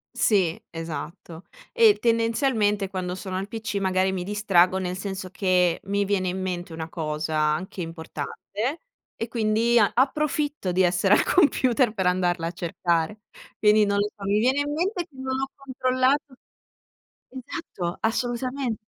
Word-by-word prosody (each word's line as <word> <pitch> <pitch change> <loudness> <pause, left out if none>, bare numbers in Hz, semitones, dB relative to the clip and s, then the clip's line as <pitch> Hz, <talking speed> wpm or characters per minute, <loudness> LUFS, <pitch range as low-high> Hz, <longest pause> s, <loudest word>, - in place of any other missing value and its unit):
Sì, 185 -6 +2
esatto. 165 +1 -7 0.3
E 455 -3 +6
tendenzialmente 230 -3 +1
quando 185 -1 -4
sono 185 0 -5
al 195 - -3
pc 220 -1 -4
magari 190 -1 +1
mi 185 -2 -3
distraggo 190 -2 +3
nel 180 -1 -2
senso 190 -1 -5
che, 180 -2 +2
mi 200 +1 0
viene 195 -2 0
in 185 +1 -2
mente 180 -2 -4
una 160 0 -5
cosa 155 -1 -3
anche 155 +5 -1
importante 170 - -5 0.3
e 225 - -4
quindi 230 +1 +2
a 210 - +4
approfitto 290 - 0
di 185 +1 +3
essere 180 +3 +4
al - - +3
computer 255 - +3
per 190 - -1
andarla 180 -2 +1
a 170 - -2
cercare. 170 +3 -1 0.4
Quindi 210 0 +5
non 200 0 0
lo 205 +1 +2
so, 200 - -11
mi 200 +1 +2
viene 260 +5 +2
in 290 0 -1
mente 355 +4 -1
che 290 - -26
non 260 0 -4
ho 270 - -1
controllato 260 +1 0 0.9
esatto, 245 - -6
assolutamen 245 +2 -1
200 Hz, 150 wpm, -25 LUFS, 180-250 Hz, 0.9 s, E